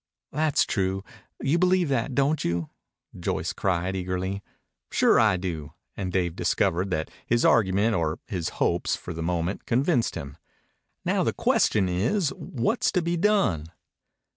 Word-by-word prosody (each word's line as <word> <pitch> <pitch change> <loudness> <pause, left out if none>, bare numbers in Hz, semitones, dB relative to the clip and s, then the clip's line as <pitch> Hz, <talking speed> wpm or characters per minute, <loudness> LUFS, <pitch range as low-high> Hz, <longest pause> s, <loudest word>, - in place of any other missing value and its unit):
"That's 155 -1 +2
true. 95 0 -1 0.4
You 145 +5 +2
believe 180 -1 +3
that, 130 -1 0
don't 140 +3 +2
you?" 85 -2 -2 0.5
Joyce - - -2
cried 95 0 -1
eagerly. 95 +1 -2 0.5
"Sure - - +4
I 105 -4 +4
do." 80 -5 -5 0.2
And 95 -2 -3
Dave 85 -2 0
discovered 90 +2 +1
that 80 -3 -2 0.2
his 120 0 +2
argument 100 +2 +3
or 80 -3 0
his 90 -6 -3
hopes - - +1
had - - -13
for - - -5
the 80 - -5
moment 85 +2 -2
convinced 130 +1 +1
him. 70 -5 -7 0.7
"Now - - +2
the - - 0
question 100 -4 +2
is, 115 - +1
what's 140 - -1
to 180 -3 +1
be 170 +1 0
done?" 175 - +2
95 Hz, 150 wpm, -26 LUFS, 90-135 Hz, 0.7 s, Sure